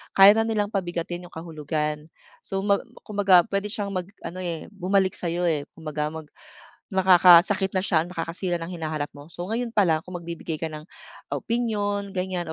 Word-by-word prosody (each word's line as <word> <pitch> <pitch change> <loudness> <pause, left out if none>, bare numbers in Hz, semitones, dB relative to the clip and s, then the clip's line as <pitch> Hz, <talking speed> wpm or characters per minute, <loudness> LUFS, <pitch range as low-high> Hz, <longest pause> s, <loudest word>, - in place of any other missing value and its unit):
kaya 195 +1 +10
na 225 +1 +2
nilang 210 -2 0
pabigatin 175 -2 -3
yung - - -22
kahulugan. 150 -1 -3 0.3
So, 195 0 -4
ma 200 -1 +3 0.2
kumbaga 200 -4 +4
pwede 200 +1 0
siyang 205 -1 -4
mag 185 -2 -3 0.2
ano, 185 +2 -6
eh, 170 +1 -5
bumalik 190 -1 +1
sa 175 - -5
'yo, 175 +2 -1
eh, 155 -5 0
kumbaga 155 -2 -3
mag 160 +1 -6 0.7
nakakasakit 185 +1 +6
na 185 - +1
siya, 165 -4 +1
nakakasira 175 0 -2
ng 165 - -5
hinahanap 155 -4 -3
mo. 145 +4 -13
So, 175 +2 -6
ngayon 230 +1 -2
pa 205 -5 +3
lang 160 0 +1
kung 180 - -11
magbibigay 170 -2 -5
ka 160 - -2
ng 155 -1 -8 0.5
opinyon 205 -4 -1
ganiyan 180 -3 -3
180 Hz, 175 wpm, -25 LUFS, 165-200 Hz, 0.7 s, kaya